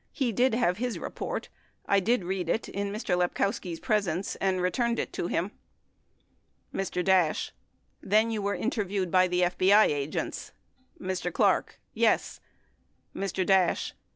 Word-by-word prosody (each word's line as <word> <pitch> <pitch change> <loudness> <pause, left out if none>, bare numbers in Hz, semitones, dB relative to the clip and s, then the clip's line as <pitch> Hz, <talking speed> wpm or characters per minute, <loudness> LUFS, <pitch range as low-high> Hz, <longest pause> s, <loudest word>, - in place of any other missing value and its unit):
He 260 -5 0
did 245 +2 +2
have 210 -7 +1
his 245 -1 -2
report. - - -5 0.4
I 200 - +3
did 220 +2 +1
read 180 -1 -3
it 225 - 0
in 200 0 -3
Mr. 205 -3 -1
Lepkowski's 180 -1 -1
presence 200 -6 -1
and 190 -1 0
returned 235 +6 0
it - - -3
to - - -2
him. 175 +5 -1 1.2
Mr. 180 -2 -2
Dash. 185 -5 +2 0.5
Then 215 +3 +3
were 200 0 -1
you - - -6
interviewed 200 -6 -1
by 185 0 +5
the 180 0 0
FBI 185 +4 +5
agents? 145 0 -3 0.5
Mr. 185 -1 -3
Clark. - - +1
Yes. - - +1 0.8
Mr. 190 -1 -2
Dash. 190 -2 +2
190 Hz, 140 wpm, -28 LUFS, 180-210 Hz, 1.2 s, by